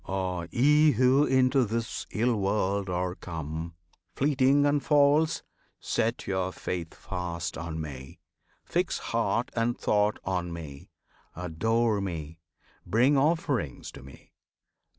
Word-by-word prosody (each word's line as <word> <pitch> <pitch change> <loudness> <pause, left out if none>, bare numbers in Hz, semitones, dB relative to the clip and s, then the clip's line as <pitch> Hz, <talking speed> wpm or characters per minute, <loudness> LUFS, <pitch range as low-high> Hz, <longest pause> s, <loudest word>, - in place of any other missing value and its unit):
Ah! 90 -3 -2
ye 150 +4 +4
who 130 +4 +4
into 130 0 +3
this 115 0 -3
ill 120 +2 +1
world 100 -1 0
are 90 0 -1
come 80 -1 -6 0.4
Fleeting 140 0 +3
and 145 0 +2
false 150 +2 +3 0.4
set 115 +2 -1
your 95 -1 -1
faith 85 -3 -5
fast 90 -2 -4
on 80 0 -5
Me! 65 -4 -8 0.5
Fix - - 0
heart - - -1
and 115 +1 0
thought 105 0 +1
on 90 -2 -2
Me! 75 -5 -9 0.5
Adore 105 +6 0
Me! 80 -4 -5 0.4
Bring 120 +10 +3
Offerings 140 - 0
to - - -12
Me! 70 +1 -15
100 Hz, 120 wpm, -28 LUFS, 85-130 Hz, 0.5 s, ye